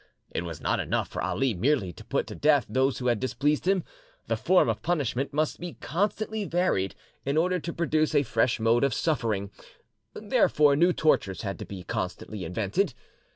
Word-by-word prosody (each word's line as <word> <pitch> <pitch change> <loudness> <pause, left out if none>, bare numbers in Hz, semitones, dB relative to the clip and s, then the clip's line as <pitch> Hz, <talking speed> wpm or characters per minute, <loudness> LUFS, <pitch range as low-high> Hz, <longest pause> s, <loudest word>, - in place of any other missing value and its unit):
It - - -2
was 85 -3 -6
not - - 0
enough - - -1
for - - -4
Ali 135 -3 0
merely 105 -2 +1
to - - -12
put - - -1
to - - -8
death 145 -3 +3
those 130 +1 +1
who 125 -1 +2
displeased 135 - 0
him, 190 -2 +3 0.4
the - - 0
form 185 0 +3
of - - -1
punishment 140 -6 -1
must 155 +1 -1
be 175 -1 -6
constantly 210 +5 -2
varied 175 - 0 0.3
in 140 +2 -1
order 180 +3 +2
to 170 - -5
produce 155 -2 0
a 145 - +5
fresh 115 -1 +1
mode 115 +2 +3
of 140 - +2
suffering, 110 -10 -1 0.6
therefore 145 -2 +3
new 175 +5 +4
tortures 115 - +1
had 100 -2 -4
to - - -6
be 95 -2 -8
constantly 100 +3 -4
invented. 105 - -1
140 Hz, 180 wpm, -27 LUFS, 110-165 Hz, 0.6 s, a